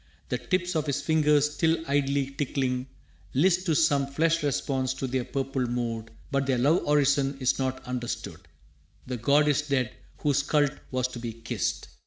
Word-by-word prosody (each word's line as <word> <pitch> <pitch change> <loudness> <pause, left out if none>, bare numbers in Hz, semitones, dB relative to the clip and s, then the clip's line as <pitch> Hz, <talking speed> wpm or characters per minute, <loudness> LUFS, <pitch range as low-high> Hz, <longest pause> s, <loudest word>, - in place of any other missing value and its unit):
The - - -1
tips 180 -1 -1
Of 155 -1 0
his 140 - 0
fingers, 150 -2 +3
still 160 +2 +2
idly 140 -1 +1
tickling, 130 -2 -1 0.5
list 180 +5 +3
To 160 - +2
some 145 -3 +3
flesh 165 +4 +1
response 130 -2 -1
to 135 - -3
their 130 0 -1
purple 135 -1 -2
mood. 115 -2 -3 0.2
But 140 -1 0
their 130 -2 +2
love 145 +8 +3
orison 140 -1 +3
is 130 0 +1
not 130 0 -2
understood. 125 -1 -4 0.7
The 125 -1 -4
god 140 +6 +3
is 145 -1 +3
dead 135 -4 0 0.3
whose 145 -1 +2
cult 145 0 +2 0.2
was 130 -1 0
to 125 - -7
be 115 -1 -5
kissed! 115 0 -3
140 Hz, 170 wpm, -27 LUFS, 130-150 Hz, 0.7 s, fingers